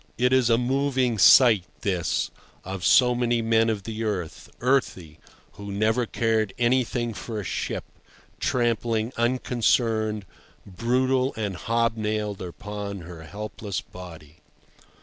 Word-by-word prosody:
It 125 +1 +2
is 130 -2 +4
a 115 - +4
moving 130 -2 0
sight 115 -4 +7 0.2
this, 90 -4 -1 0.3
of 95 -1 -5
so 125 +8 +5
many 120 -1 0
men 115 0 +3
of 105 -3 -2
the 110 +1 -5
earth, 95 -7 -4
earthy, 120 - 0 0.3
who 100 0 -9
never 110 +4 +1
cared 110 -4 0
anything 120 -1 +1
for 110 +1 -6
a - - -4
ship, - - -3 0.6
trampling 115 -1 0
unconcerned, 115 -3 +1 0.4
brutal 130 +6 0
and 105 -4 -2
hob 115 +4 0
nailed 105 -2 -2
upon 100 +2 -6
her 85 -1 -10
helpless 105 +1 -5
body. 80 -4 -12
110 Hz, 125 wpm, -25 LUFS, 100-120 Hz, 0.6 s, sight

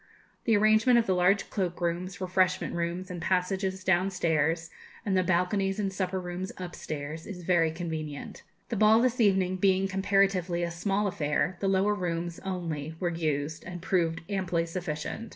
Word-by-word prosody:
The 225 -3 +4
arrangement 215 +3 +5
of 235 - +3
the 190 - +2
large 180 +3 +2
cloakrooms, 180 0 -2
refreshment 185 0 +1
rooms, 175 +2 -3
and 175 -2 -5
passages 190 +1 0
downstairs, 170 -3 +1 0.3
and 200 -2 +1
the 185 - +4
balconies 190 +2 +1
and 195 -2 -1
supper 190 0 -1
rooms 180 +1 -5
upstairs, 160 -3 -6
is 180 -4 -7
very 170 -2 +3
convenient. 160 -3 -5 0.3
The 230 - -2
ball 215 +2 +6
this 250 0 +2
evening 190 -3 +3
being 190 0 +3
comparatively 190 -2 +1
a 170 - -2
small 195 +4 0
affair, 175 0 0
the 195 - -1
lower 195 +2 +3
rooms 170 -3 -3
only 165 -5 -4
were 175 - 0
used, 155 -2 -2
and 175 -1 -7
proved 165 -2 0
amply 180 -4 0
sufficient. 170 +5 -4
180 Hz, 155 wpm, -28 LUFS, 170-195 Hz, 0.3 s, ball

